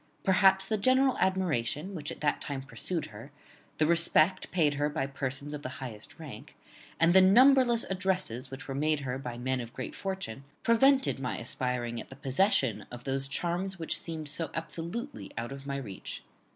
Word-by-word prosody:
Perhaps 190 0 +4
the 215 0 0
general 260 +4 +4
admiration 185 -3 0
which 150 -5 -4
at - - -9
that 145 -1 +1
time 135 -2 -4
pursued 160 +4 -3
her, 110 +7 -10 0.5
the 155 - +3
respect 170 +2 +3
paid 155 -5 +2
her 145 +1 0
by 140 -2 -1
persons 140 +1 -4
of 150 - -5
the 130 -2 -6
highest 115 -5 -7
rank, - - -10 0.4
and 165 +1 +5
the 190 - +8
numberless 240 +4 +6
addresses 185 - -1
which 135 +2 -8
were 135 - -3
made 150 +1 +1
her 130 -1 -3
by 125 -3 -6
men 130 +1 -1
of 115 -1 -9
great 130 - -5
fortune, 190 - -5 0.2
prevented 265 - +4
my 130 -2 -2
aspiring 120 0 -2
at - - -13
the 135 - -10
possession 135 - +1
of 120 0 -9
those 135 0 +1
charms 175 +6 -1
which 165 -2 -2
seemed 160 -2 -5
so 155 +3 -2
absolutely 165 - -4
out 115 +2 -3
of 135 0 -8
my 140 0 -2
reach. 105 -9 -7
150 Hz, 180 wpm, -30 LUFS, 130-190 Hz, 0.5 s, the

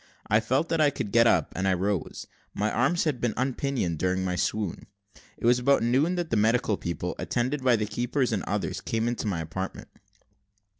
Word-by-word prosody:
I 110 - +3
felt 130 +8 0
that 165 -1 +1
I 150 - +5
could 105 -7 -5
get 115 +1 +5
up, - - +2
and 95 +1 0
I 95 - +3
rose: 95 0 -2 0.3
my 105 +1 0
arms 175 -1 +2
had 150 -6 -1
been 120 -3 0
unpinioned 130 - -1
during 95 0 0
my 90 -1 -1
swoon. 105 0 -2 0.5
It - - -5
was 120 +1 +5
about 135 0 +3
noon 135 +9 +2
that 175 -2 -3
the 115 - +2
medical 110 +1 +2
people, 85 0 -4
attended 130 +3 -1
by 125 -2 +5
the 105 -1 -1
keepers 120 +5 -1
and 105 - 0
others, 105 +1 -2
came 115 0 -1
into 120 -2 -2
my 90 -5 -1
apartment. 95 +4 -6
115 Hz, 200 wpm, -27 LUFS, 100-130 Hz, 0.5 s, I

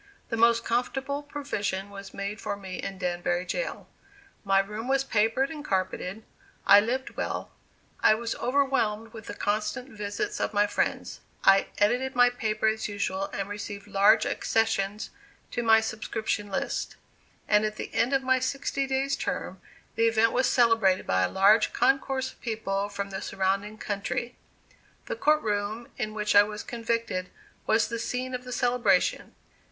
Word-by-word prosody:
The 230 - -1
most 230 0 +4
comfortable 270 +4 -1
provision 205 -10 -4
was 200 0 -9
made 200 +1 -5
for 200 - -3
me 190 -2 -7
in 195 - -5
Danbury 175 -1 -1
jail. - - -4 0.6
My 195 -2 +3
room 210 +4 -1
was 270 0 +2
papered 235 +3 +1
and 300 -2 -7
carpeted; 190 -1 -2 0.4
I 200 +1 +9
lived 250 +5 -2
well; - - -4 0.5
I 215 - +5
was 230 +1 -3
overwhelmed 245 -5 0
with 225 -1 -10
the 205 - -6
constant 215 +5 -2
visits 205 -3 -4
of - - -2
my 205 0 +5
friends; 205 - -2 0.2
I 195 0 +5
edited 245 +6 +1
my 245 0 +6
paper 220 -3 -2
as 220 0 +1
usual 195 -2 -2
and 195 0 -4
received 205 0 -6
large 205 +2 +4
accessions 215 -2 0 0.4
to 240 - -1
my 225 -1 +5
subscription 220 -1 -3
list; 190 - -3 0.5
and 210 0 +4
at 215 0 -1
the - - -7
end 245 - +2
of 270 -1 +2
my 260 0 +3
sixty 275 +1 -1
days' 270 +1 0
term - - -4 0.3
the 230 0 +3
event 225 0 +3
was 255 0 +2
celebrated 225 -6 +3
by 95 0 +2
a 90 - +2
large 205 +3 +4
concourse 270 -1 +1
of - - -24
people 205 -3 -2
from 200 -1 -5
the 190 - -4
surrounding 195 +2 -1
country. 215 +4 -3 0.7
The - - -3
court 305 -8 +2
room 210 +2 -2
in 215 0 -4
which 210 -1 0
I 205 - +10
was 210 0 -3
convicted 230 -6 -2 0.4
was 220 0 +3
the 230 +1 -4
scene 250 +2 -3
of 250 0 -4
the 250 - -7
celebration. 245 -1 +1
220 Hz, 165 wpm, -27 LUFS, 200-245 Hz, 0.7 s, I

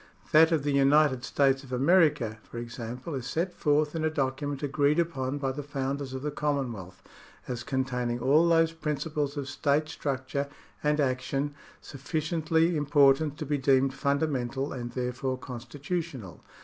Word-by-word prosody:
That 160 +2 +7
of 160 -4 +1
the 145 - 0
United 140 -1 +4
States 135 +1 +2
of 130 - -13
America, 140 -5 +3
for 120 - -11
example, 120 +5 -6
is 130 -3 -4
set 175 +5 -1
forth 150 0 +1
in 160 - -1
a 160 - +2
document 145 -1 -2
agreed 145 +1 +2
upon 145 -5 -1
by 135 -2 -1
the 140 +3 -5
founders 140 -1 -3
of 130 - -5
the 150 - -2
Commonwealth 135 -11 -3 0.4
as 120 -2 -4
containing 125 -2 -1
all 150 +7 +4
those 165 -1 +4
principles 150 -2 -3
of 140 -2 -3
state 145 +2 0
structure 140 -2 -3 0.4
and 150 0 +2
action 135 +1 -1 0.3
sufficiently 160 +3 0
important 145 0 +3
to 155 - -4
be 145 0 -1
deemed 135 0 +3
fundamental 140 -2 -1
and 120 -2 -6
therefore 125 +1 -2
constitutional. 130 - -6
140 Hz, 150 wpm, -28 LUFS, 130-150 Hz, 0.4 s, That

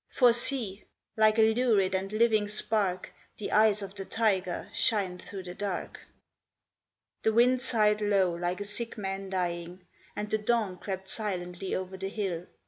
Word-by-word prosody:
For 245 -3 +5
see! 235 -5 0 0.3
like 215 0 +4
a 220 0 +5
lurid 220 -6 +2
and 190 +1 -1
living 215 -1 +3
spark 205 -3 -1 0.2
The 210 - -5
eyes 210 -1 +4
of 195 -1 -7
the 195 -1 -5
tiger 190 -4 0
shine 190 -5 +1
through 190 0 -8
the 180 -1 -7
dark.' 195 -1 -4 1.2
The 220 - +2
wind 250 +2 +4
sighed 215 -4 +2
low 195 -4 +2
like 175 +2 -2
a 205 - -4
sick 230 +3 -5
man 195 -1 -4
dying, 180 -1 -3 0.3
And 210 - -3
the 215 +1 0
dawn 210 -4 0
crept 190 0 -5
silently 185 -3 -3
over 185 0 -4
the 195 +1 -4
hill. 190 -5 -3
200 Hz, 160 wpm, -29 LUFS, 185-220 Hz, 1.2 s, For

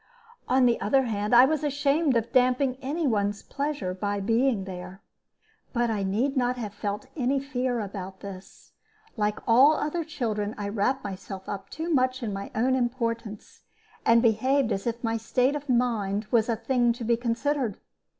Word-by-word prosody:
On 255 0 +4
the 235 -1 +2
other 265 +6 +3
hand, 210 -3 -2
I 245 +2 +9
was 310 +1 0
ashamed 285 -1 +2
of 230 +1 -2
damping 255 +1 +3
any 300 +5 -2
one's 205 -4 0
pleasure 280 -10 -3
by 205 +2 -2
being 225 +1 +1
there. 185 0 -8 0.7
But 240 -2 +1
I 210 -2 -1
need 220 +9 0
not 250 -1 +1
have 215 -4 -5
felt 205 +3 -4
any 270 0 +1
fear 255 -3 -2
about 195 -2 -6
this. 195 -2 -11 0.4
Like 210 -2 0
all 260 +6 +7
other 315 +2 -2
children, 220 -9 -3
I 205 -1 -3
wrapped 240 +6 0
myself 190 -1 -7
up 195 -1 -6
too 325 +2 -3
much 255 -2 +1
in 215 -3 -2
my 195 0 -5
own 250 +4 +2
importance, 230 -4 -3 0.4
and 230 +1 +5
behaved 250 +3 +2
as 195 - -2
if 235 +1 -3
my 225 0 0
state 250 +5 +1
of 290 -1 -6
mind 225 -5 +1
was 230 -1 +3
a 230 - +2
thing 240 +1 +1
to 240 0 -7
be 235 +1 +2
considered. 240 0 -1
235 Hz, 175 wpm, -26 LUFS, 205-265 Hz, 0.7 s, I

